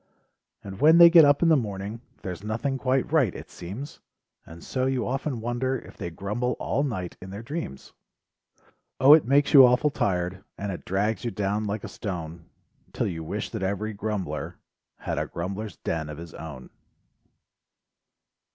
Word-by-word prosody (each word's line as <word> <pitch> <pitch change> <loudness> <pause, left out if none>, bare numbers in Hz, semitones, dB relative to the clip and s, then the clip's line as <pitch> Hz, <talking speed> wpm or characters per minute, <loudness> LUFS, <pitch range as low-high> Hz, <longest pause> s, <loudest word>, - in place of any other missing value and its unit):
And 95 -1 -8
when 160 +2 +7
they 170 0 +9
get 165 -3 +9
up 145 +3 +4
in 165 - +5
the 160 - +6
morning 105 -2 -3 0.2
There's 90 0 -6
nothing 115 +6 -2
quite 130 +2 0
right, 140 - +3
it - - -10
seems, 110 - -8 0.5
And 80 +1 -12
so 130 0 -1
you 130 -3 0
often 130 -1 -2
wonder 120 +3 -1
If - - -13
they 90 -4 -5
grumble 105 +8 -2
all 140 - -1
night 110 -11 -3
in 95 - -9
their 100 +4 -7
dreams 140 - -6 1.1
O, 135 +3 +9
it 155 - +6
makes 140 +2 +3
you 135 -3 +11
awful 125 +4 +4
tired 90 -4 -1
And 100 0 -3
it 90 - -7
drags 100 +2 -1
you 120 - -1
down 105 0 -1
like 100 +1 -3
a - - -5
stone, 85 -4 -6 0.5
'TiT - - -1
you 80 -1 -6
wish 100 +7 -4
that 110 - -4
every 100 +3 -2
grumbler 105 -1 -4 0.4
Had - - -3
a - - -2
grumblers 100 +3 -5
den 80 -2 -3
of 75 - -7
his 85 -1 -9
own. 75 -6 -9
105 Hz, 175 wpm, -26 LUFS, 95-130 Hz, 1.1 s, you